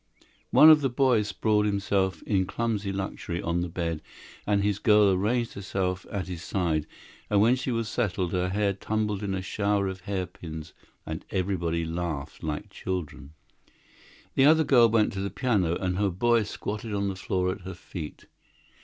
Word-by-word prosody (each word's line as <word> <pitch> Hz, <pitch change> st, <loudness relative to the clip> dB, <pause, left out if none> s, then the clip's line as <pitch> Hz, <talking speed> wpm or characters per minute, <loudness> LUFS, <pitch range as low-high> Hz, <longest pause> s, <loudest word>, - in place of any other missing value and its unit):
One 155 Hz, +1 st, +9 dB
of 155 Hz, -1 st, +6 dB
the 135 Hz, -, +1 dB
boys 120 Hz, -4 st, +2 dB
sprawled 105 Hz, +1 st, +1 dB
himself, 100 Hz, -3 st, 0 dB
in 95 Hz, -3 st, +1 dB
clumsy 105 Hz, -2 st, -2 dB
luxury, 95 Hz, -3 st, -4 dB
on 85 Hz, +1 st, -1 dB
the 90 Hz, -, -2 dB
bed, 85 Hz, -2 st, -3 dB, 0.5 s
and 100 Hz, -1 st, +2 dB
his 105 Hz, -1 st, 0 dB
girl 105 Hz, -3 st, +5 dB
arranged 115 Hz, +5 st, 0 dB
herself 95 Hz, -2 st, -3 dB
at 100 Hz, -2 st, -3 dB
his 90 Hz, -3 st, -6 dB
side, 85 Hz, -5 st, -1 dB, 0.4 s
and 105 Hz, -, +3 dB
when 115 Hz, +5 st, +5 dB
she 130 Hz, +1 st, -4 dB
was 115 Hz, -2 st, -1 dB
settled 95 Hz, -7 st, -1 dB
her 90 Hz, 0 st, 0 dB
hair 100 Hz, +1 st, +1 dB
tumbled 105 Hz, +1 st, -2 dB
in 100 Hz, -2 st, -2 dB
a 95 Hz, -, -3 dB
shower 100 Hz, 0 st, 0 dB
of 95 Hz, 0 st, -5 dB
hairpins, 90 Hz, -5 st, -6 dB, 0.3 s
and 80 Hz, +1 st, -5 dB
everybody 85 Hz, -3 st, -1 dB
laughed 80 Hz, -4 st, -4 dB
like 75 Hz, -2 st, -4 dB
children. 85 Hz, -5 st, -5 dB, 1.0 s
The 135 Hz, -, +4 dB
other 160 Hz, +2 st, +6 dB
girl 120 Hz, -6 st, +5 dB
went 110 Hz, -1 st, +2 dB
to 100 Hz, -, -4 dB
the 100 Hz, -, -2 dB
piano, 100 Hz, -8 st, +1 dB
and 90 Hz, 0 st, -2 dB
her 100 Hz, -1 st, +2 dB
boy 115 Hz, +6 st, +2 dB
squatted 105 Hz, +1 st, -5 dB
on 100 Hz, 0 st, 0 dB
the 95 Hz, -, -2 dB
floor 90 Hz, -1 st, -1 dB
at -, -, -7 dB
her 95 Hz, 0 st, -7 dB
feet. 85 Hz, -3 st, -8 dB
100 Hz, 175 wpm, -27 LUFS, 90-105 Hz, 1.0 s, One